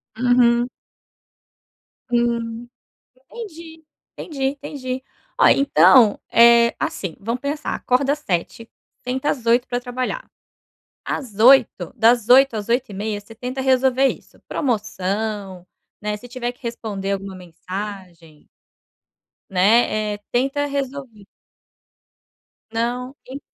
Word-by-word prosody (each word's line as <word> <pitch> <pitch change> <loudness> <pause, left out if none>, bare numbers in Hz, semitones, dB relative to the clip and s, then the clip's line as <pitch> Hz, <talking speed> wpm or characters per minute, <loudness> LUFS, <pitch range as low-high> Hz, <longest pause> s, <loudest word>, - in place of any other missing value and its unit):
Uhum. 245 0 +3 1.4
Hum. 235 -1 -1 0.6
Entendi, 330 -8 -10 0.3
entendi, 280 -5 -7 0.2
entendi. 260 -2 -5 0.3
Ó, - - +6
então, 205 - +5
é 235 0 +6
assim, 180 -5 -3
vamos 230 +4 -3
pensar. 295 +2 -3
Acorda 270 +3 +1
7:00, 230 - -4 0.4
senta 260 +3 -2
às 250 -5 -4
8:00 240 +2 +3
pra 245 - -1
trabalhar. 255 - -4 0.7
Às 225 -8 -5
8:00 240 -6 +5
das 230 0 +3
8:00 265 -1 +6
às 210 0 -4
8:30, 215 -4 -2
você 225 +2 -15
tenta 250 +3 -5
resolver 265 0 +3
isso, - - -5
promoção, 205 -5 -3 0.3
né, 210 0 -3
se 225 +4 -12
tiver 245 -1 -4
que 245 - -30
responder 210 -4 -4
alguma 195 -1 -5
mensagem 180 -2 -9 1.0
né, 210 +2 +2
eh, - - -13
tenta 275 +4 0
resolver. 270 -7 -5 1.5
Não, 245 +4 -3
en 265 +2 -7
235 Hz, 105 wpm, -21 LUFS, 210-260 Hz, 1.5 s, Ó